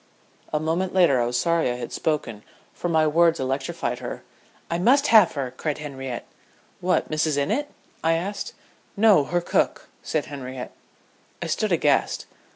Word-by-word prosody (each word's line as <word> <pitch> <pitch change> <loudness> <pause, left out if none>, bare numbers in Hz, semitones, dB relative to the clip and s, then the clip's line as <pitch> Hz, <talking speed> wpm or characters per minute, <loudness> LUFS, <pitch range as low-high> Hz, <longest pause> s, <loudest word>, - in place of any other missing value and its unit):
A 150 - +1
moment 170 +4 -1
later 155 -9 +5
I 120 - +1
was 120 0 -1
sorry 170 -4 +2
I 120 - -1
had 120 -1 -6
spoken, 130 -9 -2 0.3
for 175 - -3
my 160 -1 +3
words 165 +2 +3
electrified 130 -1 -2
her. - - -6 0.4
"I 170 - -2
must 270 +9 +4
have 210 -6 +7
her!" 135 -4 -3
cried 150 +2 -2
Henriette. 135 -4 -6 0.5
"What, 180 -2 0
Mrs. 155 -1 +1
Innitt?" 280 - 0 0.3
I 165 0 +3
asked. 185 +5 -3 0.4
"No 205 -9 +5
her 175 +3 0
cook," - - 0
said 155 -4 -1
Henriette. 130 -2 -7 0.7
I - - -4
stood - - -1
aghast. - - +2
155 Hz, 160 wpm, -24 LUFS, 135-175 Hz, 0.7 s, have